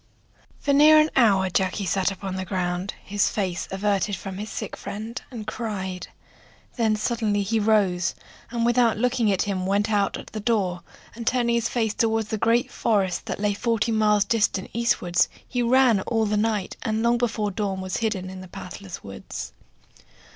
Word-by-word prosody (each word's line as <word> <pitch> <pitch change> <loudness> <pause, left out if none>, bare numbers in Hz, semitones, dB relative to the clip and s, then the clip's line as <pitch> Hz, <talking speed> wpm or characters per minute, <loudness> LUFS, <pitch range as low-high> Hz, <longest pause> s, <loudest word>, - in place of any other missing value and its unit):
FOR 280 - 0
near 305 +2 +7
an 305 0 +3
hour 200 -7 +4
Jacky 190 +2 0
sat 190 +1 +1
upon 195 -1 -5
the 190 - -3
ground, 180 0 -2
his 205 0 +1
face 185 -4 -2
averted 200 +1 0
from 190 +1 -7
his 210 +1 -5
sick 215 - -5
friend, 225 +4 -6
and 230 -5 -7
cried; 190 -6 -4 0.7
then 225 -3 +2
suddenly 215 -2 0
he 220 +3 0
rose, 200 -5 +2 0.3
and 235 -1 -1
without 240 -2 +3
looking 245 -2 +2
at 190 - +1
him 190 -2 -2
went 205 +3 +1
out 200 -2 +1
at - - -9
the 215 - -3
door, 200 -5 0 0.3
and 230 0 -8
turning 240 -2 +2
his 235 -1 +1
face 225 -3 0
toward 225 -1 +1
the 220 - -1
great 230 +3 +2
forests 195 -5 +1
that - - -4
lay 205 0 +1
forty 230 +1 0
miles 210 -2 +3
distant 205 -3 0
eastward, 225 -7 0 0.3
he 245 - -1
ran 245 -2 +4
all 225 +2 0
the 210 0 0
night, 210 -2 0
and 220 0 -1
long 235 0 +3
before 220 -3 0
dawn 195 0 -2
was 185 0 -3
hid 220 -2 0
in 185 0 -7
the 185 - -10
pathless 185 +1 -9
woods. 100 0 -7
210 Hz, 180 wpm, -24 LUFS, 190-230 Hz, 0.7 s, near